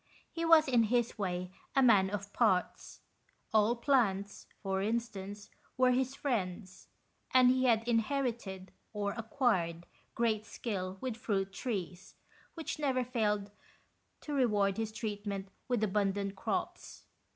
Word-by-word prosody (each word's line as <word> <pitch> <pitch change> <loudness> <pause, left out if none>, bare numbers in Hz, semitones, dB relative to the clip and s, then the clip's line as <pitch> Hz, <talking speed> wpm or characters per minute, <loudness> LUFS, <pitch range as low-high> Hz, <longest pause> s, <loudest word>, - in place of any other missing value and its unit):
He 335 - -4
was, 325 -2 +7
in 240 -4 +4
his 240 0 0
way, 180 -2 -2 0.2
a 270 - +5
man 200 -6 +5
of 200 0 -5
parts. 190 -7 0 0.5
All 220 +2 +4
plants, 225 -7 +1 0.2
for 190 -1 -1
instance, 205 -2 -3 0.3
were 255 0 +5
his 260 +1 0
friends, 190 -8 -3 0.5
and 250 -1 +7
he 260 0 +2
had 230 -2 +3
inherited, 230 -5 -1 0.2
or 205 -1 -1
acquired, 220 - 0 0.3
great 220 -2 +1
skill 190 -4 -4
with 255 -4 -3
fruit 195 -4 -1
trees, 185 -6 -5 0.4
which 325 -2 -5
never 265 -4 +1
failed 210 -4 -1 0.7
to 295 - -5
reward 210 -7 +2
his 225 -1 -2
treatment 205 -3 -4 0.2
with 245 -4 0
abundant 200 -1 0
crops. 190 - -4
215 Hz, 130 wpm, -32 LUFS, 195-245 Hz, 0.7 s, was